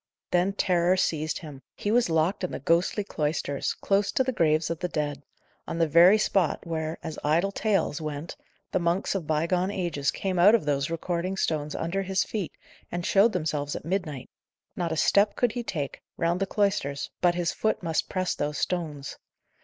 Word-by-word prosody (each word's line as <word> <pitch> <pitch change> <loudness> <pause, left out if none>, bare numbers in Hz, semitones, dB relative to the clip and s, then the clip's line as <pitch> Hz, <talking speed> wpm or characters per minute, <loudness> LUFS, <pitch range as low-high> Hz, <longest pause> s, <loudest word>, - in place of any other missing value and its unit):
Then 180 +2 +2
terror 180 -2 +2
seized 155 -4 0
him. 145 -5 -9
He 205 - -2
was 240 -4 +3
locked 165 +5 +1
in 180 - -1
the - - -4
ghostly 170 +8 +1
cloisters, 150 -5 -2
close 200 0 +1
to 260 - +3
the 260 - -1
graves 160 -6 +2
of 165 - -3
the 180 - -1
dead; 150 -4 -3 0.5
on - - -3
the 165 -1 +3
very 175 +7 +7
spot 195 -6 +1
where, 160 -1 -3
as 160 - -5
idle 170 +7 +2
tales, 200 -7 0
went, 155 +1 -5 0.4
the - - +1
monks 170 +2 0
of 185 -6 -3
bygone 170 +4 +1
ages 170 -8 -1
came 185 -2 -2
out 205 +6 +7
of 215 - 0
those 140 -1 0
recording 175 +3 -2
stones 150 -4 -1
under 170 +4 -1
his 190 0 +1
feet, 205 -6 -4 0.4
and 175 0 -3
showed 205 +3 +4
themselves 150 -4 -2
at - - -6
midnight. 160 -7 -3 0.4
Not 175 -5 -2
a 160 - -2
step 200 +5 +3
could 245 -2 +2
he 245 - -3
take, 150 - -4 0.2
round 170 +1 +1
the 195 - 0
cloisters, 190 -10 0
but 175 -1 +3
his 175 -1 0
foot 220 -4 -1
must 165 -2 -1
press 185 -2 -1
those 145 +1 -2
stones. 155 -6 -3
170 Hz, 190 wpm, -27 LUFS, 155-195 Hz, 0.5 s, very